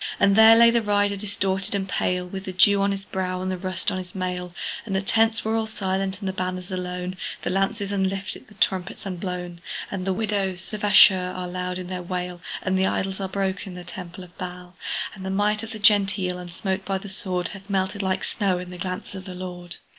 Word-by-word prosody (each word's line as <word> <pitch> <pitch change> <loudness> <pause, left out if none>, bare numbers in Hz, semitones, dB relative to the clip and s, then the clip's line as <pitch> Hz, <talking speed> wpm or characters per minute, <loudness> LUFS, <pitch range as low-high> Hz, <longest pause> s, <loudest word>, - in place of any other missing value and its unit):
And 200 0 +5
there 220 +1 +9
lay 235 0 +8
the 235 0 +3
rider 205 -1 +2
distorted 195 -1 -1
and 195 -1 -1
pale, 180 -1 0
With 190 +2 -6
the 185 - -3
dew 200 +2 +5
on 200 - +3
his 195 0 -3
brow, 185 -1 -2
and 185 0 -2
the 185 - -2
rust 185 +2 -2
on 185 - -2
his 180 0 -8
mail: 180 -1 -2 0.3
And 205 -4 -3
the 190 - +2
tents 225 +2 +3
were 220 +1 +1
all 225 -1 +1
silent, 195 -2 -1
the 190 -3 -2
banners 185 0 -3
alone, 180 0 -3 0.3
The - - 0
lances 195 +2 0
unlifted, 195 0 -2
the 210 - -17
trumpet 190 +1 0
unblown. 180 -2 -4 0.3
And 195 -2 -2
the - - +3
widows 195 -2 +1
of 210 - -4
Ashur 190 -3 +7
are 180 -1 -3
loud 180 0 -3
in 185 - -5
their 180 0 -4
wail, 180 0 -4 0.2
And 185 0 +1
the 190 - +3
idols 190 0 -1
are 190 -1 -2
broke 190 0 -1
in 185 - -7
the 180 - -7
temple 180 +1 -7
of 180 0 -15
Baal; 180 0 -7 0.4
And 190 - -9
the 190 - -3
might 205 +2 +2
of 225 - -6
the 225 - -5
Gentile, 195 -3 +3
unsmote 190 +2 -3
by 195 0 -1
the 195 - -8
sword, 185 -3 -2
Hath 195 0 -11
melted 195 +1 0
like 190 -1 0
snow 195 -4 +1
in 180 0 -6
the 180 - -8
glance 185 +1 -4
of 190 -1 -7
the 185 -2 -7
Lord! 180 -1 -6
190 Hz, 225 wpm, -25 LUFS, 180-200 Hz, 0.4 s, there